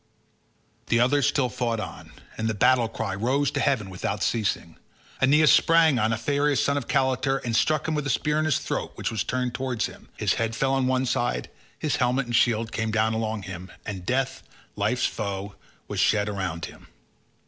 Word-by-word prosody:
The 115 - +2
others 135 +3 +3
still 135 -3 +2
fought 115 -1 -2
on, - - -7 0.2
and 110 - -2
the 110 - -1
battle 120 +3 +4
cry 110 -3 -3
rose 130 +8 +1
to - - -2
heaven 130 -8 +1
without 95 - -3
ceasing. 110 -3 -1 0.4
Aeneas 150 +4 +5
sprang 160 -5 +5
on 110 +1 +2
Aphareus 140 +5 +1
son 140 +3 +2
of 140 -4 -3
Caletor, 135 0 +1
and 115 -2 -1
struck 155 +7 +2
him 160 - 0
with 150 -2 -1
a - - -2
spear 150 +3 +1
in 155 - +1
his 155 -5 +2
throat - - -3
which - - -3
was 110 -4 -1
turned 125 -1 -2
towards 125 -2 -1
him; - - -10
his - - +1
head 115 -1 -1
fell 135 +4 +1
on 135 -1 +1
one 130 0 +1
side, 120 -1 -1 0.3
his 150 - -1
helmet 125 +2 +1
and 120 0 -2
shield 115 0 +2
came 110 -1 -2
down 110 +1 +1
along 110 -1 -2
with 95 - -9
him, 95 0 -8
and 95 -3 -5
death, 130 +5 -1 0.3
life's 105 +5 0
foe, 100 -1 -3 0.3
was - - -4
shed 105 -1 +3
around 95 -5 -3
him. - - -13
120 Hz, 200 wpm, -25 LUFS, 110-135 Hz, 0.4 s, Aeneas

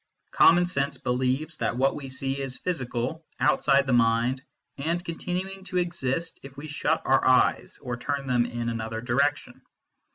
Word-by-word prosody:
Common 175 +2 +6
sense 140 -5 -1
believes 130 +4 -1
that 120 - -1
what 135 +1 +3
we 140 -2 -7
see 135 +1 -2
is 130 -1 -3
physical, 130 -2 -3 0.2
outside 140 0 +3
the 130 - 0
mind, 120 +2 +2 0.4
and 170 +5 -1
continuing 185 +3 -4
to 185 -1 -3
exist 170 -2 -2
if 140 0 -12
we 145 - -7
shut 150 -1 -1
our - - +3
eyes - - +3
or 120 -1 -3
turn 140 +2 -3
them 120 -2 +2
in 120 0 -3
another 115 -1 -4
direction. 140 +5 0
135 Hz, 160 wpm, -26 LUFS, 125-160 Hz, 0.4 s, Common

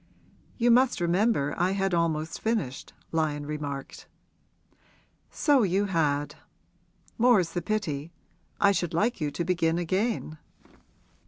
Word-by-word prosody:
'You 240 0 +3
must 250 -1 +4
remember 175 -3 +1
I 180 +2 +2
had 195 -1 0
almost 160 -2 -1
finished,' 215 - -2 0.2
Lyon 150 -2 -1
remarked. 145 -2 -6 1.2
'So 285 -4 +3
you 195 0 +1
had. 150 -6 0 0.9
More's 220 -8 +4
the 175 - -2
pity. 165 -6 -3 0.5
I 200 - +5
should 175 -4 -1
like 215 +3 0
you 150 - 0
to 170 +4 -4
begin 170 -2 +1
again.' 185 -2 -2
175 Hz, 115 wpm, -27 LUFS, 155-205 Hz, 1.2 s, I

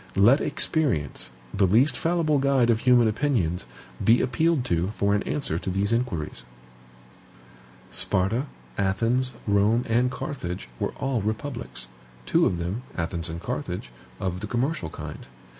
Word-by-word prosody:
Let 115 +9 +6
experience, 115 - +1 0.2
the 95 - +3
least 120 +10 +4
fallible 165 -3 +1
guide 135 -3 +3
of 110 - +2
human 125 -1 +5
opinions, 105 - 0 0.4
be 115 +2 +5
appealed 155 +1 +1
to 85 -4 +1
for 100 0 +2
an 105 - +2
answer 110 - -1
to 95 - -4
these 100 +4 +1
inquiries. 100 - -2 1.5
Sparta, 110 +9 +1 0.3
Athens, 115 +7 +1
Rome, 105 +3 +3
and 120 +2 +3
Carthage 90 - -5
were - - -1
all 130 -4 -1
republics; 110 - -4 0.4
two - - +3
of 90 - -1
them, 90 +7 -3 0.2
Athens 85 0 -3
and 80 +1 -5
Carthage, 90 - -4 0.3
of 90 -1 -2
the 105 - -5
commercial 125 - -1
kind. - - -8
110 Hz, 140 wpm, -26 LUFS, 90-130 Hz, 1.5 s, Let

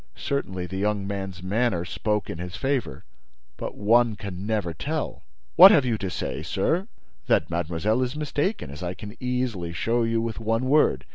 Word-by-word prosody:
Certainly, 95 -10 -2
the 95 +2 -5
young 105 -1 0
man's 95 -3 -5
manner 100 -2 0
spoke 105 +4 -1
in 85 - -6
his 90 0 -6
favor; 135 - -2 0.5
but - - -6
one 115 +2 +4
can 100 -1 -6
never 105 -6 -1
tell! 150 - -3 0.3
"What 185 +3 +11
have 150 -9 +5
you 120 -2 +1
to 95 - -3
say, 90 - -4
sir?" 170 - 0 0.4
"That - - +2
mademoiselle 85 +7 0
is 125 +2 -1
mistaken, 150 - -2
as 75 - -9
I 90 0 -3
can 105 +3 -9
easily 125 -9 -2
show 115 +7 0
you 115 0 +1
with 115 0 -3
one 115 +2 0
word. 150 +4 +3
105 Hz, 180 wpm, -25 LUFS, 90-125 Hz, 0.5 s, What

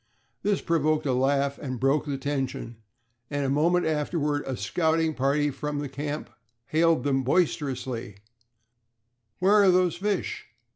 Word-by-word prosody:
This 200 -1 0
provoked 155 -2 +1
a 135 - +1
laugh 140 +2 +1
and 130 -4 -5
broke 140 +3 +2
the 140 -1 -2
tension, 135 -4 -3 0.5
and 145 -1 -1
a 135 - 0
moment 170 +5 +2
afterward 150 -1 0
a 130 -2 -3
scouting 160 -1 +1
party 145 +2 +1
from 150 +1 -4
the 145 0 -3
camp 145 +2 -5 0.3
hailed 160 0 +2
them 135 -2 +1
boisterously: 130 - -1 1.2
"Where 190 +3 +3
are 195 - +6
those 180 -2 +3
fish?" 205 +1 -2
145 Hz, 140 wpm, -26 LUFS, 135-160 Hz, 1.2 s, are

